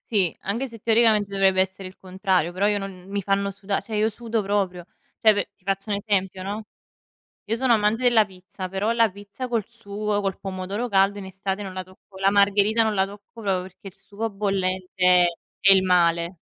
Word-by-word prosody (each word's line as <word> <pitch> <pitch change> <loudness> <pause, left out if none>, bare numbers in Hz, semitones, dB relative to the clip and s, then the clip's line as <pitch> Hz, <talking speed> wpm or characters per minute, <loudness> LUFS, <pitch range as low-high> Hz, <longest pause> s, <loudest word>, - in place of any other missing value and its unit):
Sì, 195 -7 +1
anche 230 +7 -2
se, 230 -2 -11
teoricamente, 220 -2 +3
dovrebbe 195 -1 +3
essere 190 0 -3
il 185 - -13
contrario, 185 -2 0
però 190 +3 +1
io 210 -1 +2
non 190 -2 -7
mi 200 +1 -2
fanno 200 +1 0
suda 200 0 -3
cioè 220 - -7
io 215 +1 +2
sudo 225 0 -2
proprio. 195 -3 -1 0.4
Cioè 220 -1 +6
pe 205 - -2
ti - - -35
faccio 195 +2 -2
un 205 - +1
esempio, 195 -2 -1
no, 205 +3 -4 0.8
io 225 - -1
sono 255 0 +2
amante 220 +1 +2
della 240 -4 +5
pizza, 185 0 -9
però 195 +4 -1
la 230 -2 +3
pizza 205 +6 -8
col 230 -4 0
sugo, 210 -2 -2
col 195 -2 -2
pomodoro 195 +4 -4
caldo, 195 -1 +3
in 200 - -7
estate 195 +1 -4
non 195 -2 -6
la 185 0 -4
tocco 185 +1 -17
La 195 +1 +3
margherita 205 +2 +3
non 220 -1 +1
la 190 -1 +2
tocco 205 +3 -13
proprio, 195 -4 0
perché 190 +2 -14
il 185 - -15
sugo 220 +3 -5
bollente 185 -3 +2 0.3
è 195 - +5
il 190 -1 +5
male. 170 -1 +2
200 Hz, 205 wpm, -24 LUFS, 190-210 Hz, 0.8 s, Cioè